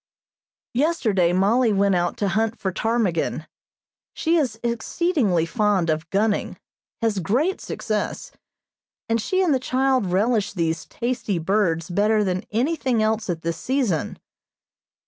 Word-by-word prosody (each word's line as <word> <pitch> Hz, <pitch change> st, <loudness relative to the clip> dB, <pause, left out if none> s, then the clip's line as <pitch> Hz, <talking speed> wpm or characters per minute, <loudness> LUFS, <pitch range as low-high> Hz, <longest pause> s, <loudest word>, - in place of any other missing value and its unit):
Yesterday 235 Hz, -, +2 dB
Mollie 215 Hz, +6 st, +3 dB
went 200 Hz, 0 st, +3 dB
out 175 Hz, -1 st, 0 dB
to 200 Hz, -, 0 dB
hunt 225 Hz, +4 st, 0 dB
for 190 Hz, -, -2 dB
ptarmigan. 220 Hz, -4 st, -1 dB, 0.7 s
She 330 Hz, +1 st, +1 dB
is 255 Hz, -9 st, 0 dB
exceedingly 235 Hz, -, 0 dB
fond 195 Hz, -3 st, +1 dB
of 155 Hz, +1 st, -3 dB
gunning, 205 Hz, +2 st, 0 dB, 0.5 s
has 220 Hz, -3 st, +1 dB
great 255 Hz, -, 0 dB
success, 215 Hz, -2 st, -3 dB, 0.8 s
and 230 Hz, 0 st, +1 dB
she 375 Hz, -, +1 dB
and 335 Hz, -5 st, +3 dB
the 265 Hz, -, +2 dB
child 255 Hz, -3 st, +1 dB
relish 205 Hz, +3 st, +1 dB
these 165 Hz, -3 st, -1 dB
tasty 235 Hz, -5 st, -2 dB
birds 165 Hz, -2 st, 0 dB
better 210 Hz, +3 st, +2 dB
than 185 Hz, -2 st, -2 dB
anything 255 Hz, -1 st, 0 dB
else 220 Hz, -1 st, 0 dB
at 165 Hz, -2 st, -3 dB
this 165 Hz, -1 st, -2 dB
season. 245 Hz, -, -1 dB
215 Hz, 130 wpm, -23 LUFS, 185-245 Hz, 0.8 s, Mollie